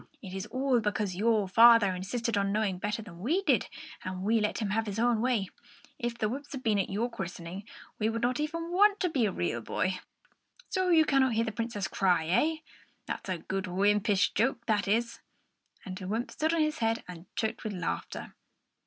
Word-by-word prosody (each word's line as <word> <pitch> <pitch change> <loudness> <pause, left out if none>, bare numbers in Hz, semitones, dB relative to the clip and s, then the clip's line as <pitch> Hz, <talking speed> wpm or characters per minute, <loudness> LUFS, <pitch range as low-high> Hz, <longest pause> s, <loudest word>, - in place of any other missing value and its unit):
"It 190 -4 -9
is 190 +2 -4
all 260 0 +1
because 210 -3 -1
your 215 0 +2
father 230 -1 +7
insisted 225 +5 -2
on 200 -1 +1
knowing 205 -3 0
better 210 +3 -2
than 175 -5 -12
we 320 - 0
did, - - +2 0.4
and 185 0 -5
we 225 +3 +3
let 210 - 0
him 210 -4 -2
have 220 +1 0
his 205 0 -4
own 235 -1 +2
way. 230 -6 +1 0.5
If 240 -1 -3
the 215 - 0
wymps 280 +6 -6
had 270 - -5
not - - -26
been 215 -3 +2
at 195 - -1
your 215 +5 0
christening, 190 -3 -7 0.3
you 220 +1 +1
would 230 +1 -3
not 250 +3 +1
even 330 +3 -3
want 410 +3 +4
to 360 - +2
be 255 -8 +1
a - - -1
real 115 - -2
boy. 185 +10 -1 0.7
So 370 -1 0
you 320 -2 +6
cannot 270 -4 +3
hear 225 +1 +1
the 220 - -2
Princess 225 -3 -3
cry, 180 -4 +2
eh? 240 - +2 0.5
That's - - -5
a 185 - -1
good 190 +3 -3
wympish 200 +2 +2
joke, 235 +1 0
that 210 -3 +1
is!" 230 +3 0 0.7
And 185 -2 -6
the 185 0 -7
wymp 225 +5 -2
stood 315 +2 0
on 325 - +2
his 305 0 0
head 225 0 0
and 180 0 -10
choked 220 -1 -2
with 215 - -3
laughter. 180 -3 -4
220 Hz, 210 wpm, -29 LUFS, 195-245 Hz, 0.7 s, father